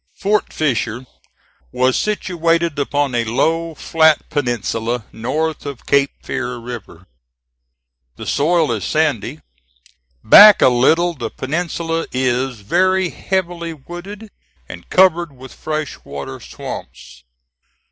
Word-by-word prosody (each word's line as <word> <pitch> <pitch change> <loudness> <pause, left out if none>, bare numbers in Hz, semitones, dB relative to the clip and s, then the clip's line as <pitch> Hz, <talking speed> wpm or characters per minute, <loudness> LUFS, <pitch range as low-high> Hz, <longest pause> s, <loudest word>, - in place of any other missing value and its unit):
Fort 210 0 0
Fisher 125 -4 -1 0.7
was 130 0 +1
situated 170 -6 0
upon 145 -1 0
a 120 -1 +1
low, 160 +8 0
flat 160 -1 +2
peninsula 120 -3 -2
north 150 +8 -2
of 140 -4 -8
Cape 140 0 +3
Fear 125 - -3
River. 115 -7 -9 1.1
The - - -9
soil 160 0 +1
is 110 -5 -2
sandy. - - -1 0.8
Back 205 - +9
a - - +6
little 160 +8 +3
the 120 -7 -5
peninsula 165 +4 -3
is 125 -2 -1
very 185 - +1
heavily 175 -3 -3
wooded, 190 +8 -10 0.4
and - - -11
covered 175 -4 +3
with 130 +1 -12
fresh 155 -2 -5
water 70 -1 -7
swamps. 65 - -9
150 Hz, 110 wpm, -18 LUFS, 125-170 Hz, 1.1 s, Back